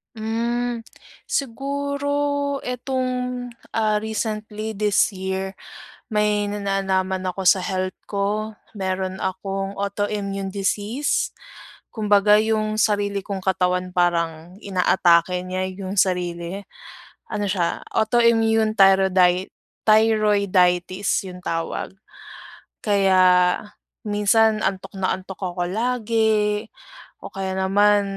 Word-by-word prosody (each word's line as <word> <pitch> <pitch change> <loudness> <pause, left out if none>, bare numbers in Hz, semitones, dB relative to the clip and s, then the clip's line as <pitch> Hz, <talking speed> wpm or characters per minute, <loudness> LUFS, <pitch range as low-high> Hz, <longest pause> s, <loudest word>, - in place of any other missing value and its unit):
Hmm, 235 +1 -2 0.4
siguro 280 +2 -1
etong 250 0 -3 0.2
ah, 215 -1 +2
recently 215 0 -4
this 210 +1 +3
year 190 0 -4 0.5
may 210 -1 +2
na 205 - -4
nalaman 190 -1 -1
ako 190 0 -2
sa 185 0 +5
health 185 -1 -2 0.2
ko, 210 +2 -1 0.2
meron 190 -1 -3
akong 195 +1 -3
autoimmune 200 -1 -2
disease. 205 +7 -1 0.6
Kumbaga 210 -1 +4
yung 215 0 0
sarili 205 -2 +1
kong 195 -1 -5
katawan 180 -1 0
parang 170 -1 0
inaatake 180 -2 +3
niya 185 +1 -3
yung 195 +1 -5
sarili, 180 0 0 0.7
ano 205 - -3
siya 185 -4 -1
autoimmune 225 -1 +3
thyrodi 190 -2 +4 0.3
thyroiditis 200 -4 +2
yung 180 0 -10
tawag. 165 0 -3 0.9
Kaya 195 -3 +3 0.8
minsan, 215 +1 +3
antok 190 -3 -2
na 185 - +1
antok 190 +1 -10
ako 180 -1 -2
lagi, 220 0 0 0.5
o - - -8
kaya 190 -1 -3
naman, 205 +2 +4
200 Hz, 95 wpm, -22 LUFS, 190-220 Hz, 0.9 s, sa